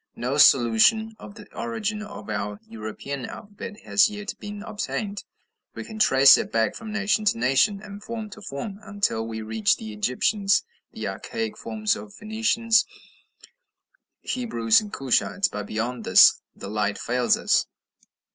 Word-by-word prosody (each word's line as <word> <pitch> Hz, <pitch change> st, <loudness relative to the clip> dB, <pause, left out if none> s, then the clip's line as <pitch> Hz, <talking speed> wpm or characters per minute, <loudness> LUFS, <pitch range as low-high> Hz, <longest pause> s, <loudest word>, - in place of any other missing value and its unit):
No 130 Hz, +4 st, -2 dB
solution 140 Hz, -, +5 dB
of 200 Hz, -, -11 dB
the 210 Hz, -2 st, -12 dB
origin 215 Hz, -2 st, -3 dB
of 210 Hz, -1 st, -9 dB
our 105 Hz, -1 st, -4 dB
European 115 Hz, +5 st, -6 dB
alphabet 210 Hz, +1 st, -9 dB
has 205 Hz, -, +3 dB
yet 210 Hz, 0 st, -6 dB
been 205 Hz, 0 st, -7 dB
obtained: 210 Hz, -1 st, -4 dB, 0.5 s
we -, -, -6 dB
can 220 Hz, -1 st, -9 dB
trace 135 Hz, -8 st, +7 dB
it -, -, -4 dB
back 110 Hz, -2 st, +1 dB
from 225 Hz, -2 st, -8 dB
nation 215 Hz, 0 st, 0 dB
to 205 Hz, -, +2 dB
nation, 135 Hz, -, +2 dB
and 205 Hz, 0 st, -10 dB
form 225 Hz, -2 st, -5 dB
to 215 Hz, -, -11 dB
form, 195 Hz, +4 st, -6 dB
until 200 Hz, -, -2 dB
we 110 Hz, -1 st, -5 dB
reach 110 Hz, -1 st, +1 dB
the 110 Hz, -1 st, -8 dB
Egyptians, 195 Hz, -, +1 dB, 0.3 s
and -, -, -8 dB
the -, -, -1 dB
archaic 225 Hz, -2 st, -4 dB
forms 215 Hz, -1 st, -1 dB
of -, -, -8 dB
the 205 Hz, -, -17 dB
Phoenicians, 225 Hz, +1 st, +1 dB, 1.4 s
Hebrews, 120 Hz, -, +1 dB
and 210 Hz, -1 st, -9 dB
Cushites, 135 Hz, +8 st, +1 dB
but 105 Hz, -1 st, -5 dB
beyond 115 Hz, +2 st, -3 dB
this -, -, +6 dB
the -, -, -9 dB
light 105 Hz, 0 st, -1 dB
fails 125 Hz, 0 st, +1 dB
us. -, -, +2 dB
200 Hz, 155 wpm, -24 LUFS, -, 1.4 s, trace